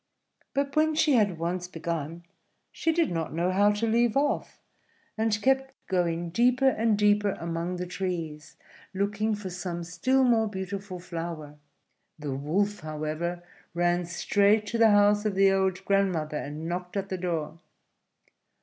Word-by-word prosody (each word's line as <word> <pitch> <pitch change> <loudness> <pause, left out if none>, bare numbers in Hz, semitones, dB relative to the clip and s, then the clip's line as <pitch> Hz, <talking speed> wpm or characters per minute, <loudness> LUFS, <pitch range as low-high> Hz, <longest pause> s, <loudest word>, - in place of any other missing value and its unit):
But 280 0 -1
when 310 0 +3
she 305 -1 +3
had 205 -8 +3
once 175 +2 -2
begun 165 -1 -4 0.5
she 325 - 0
did 330 -1 +1
not 165 -2 -3
know 175 +2 +1
how 205 +2 +4
to 210 +2 -1
leave 235 +1 +2
off, 285 +1 -1 0.6
and 220 -1 0
kept 265 0 +1
going 170 -2 -1
deeper 250 +6 +4
and 225 -3 +1
deeper 205 -1 +2
among 170 +2 -3
the 180 0 -4
trees 165 -5 -5 0.4
looking 210 +2 0
for 200 -3 -7
some 175 -1 -4
still 255 +11 +1
more 230 -3 +3
beautiful 190 -1 -5
flower. 165 -4 -6 0.6
The 150 -3 -4
Wolf, 195 +9 0
however, 155 +3 -4 0.3
ran 175 0 +1
straight 205 +5 +2
to 230 - -2
the 225 -1 +7
house 205 0 +4
of 210 -3 -1
the 195 0 +5
old 190 -1 0
grandmother, 180 -7 +1
and 150 +3 -5
knocked 180 +2 -4
at 195 0 -3
the 185 - -2
door. 165 -3 -3
190 Hz, 150 wpm, -27 LUFS, 170-215 Hz, 0.6 s, the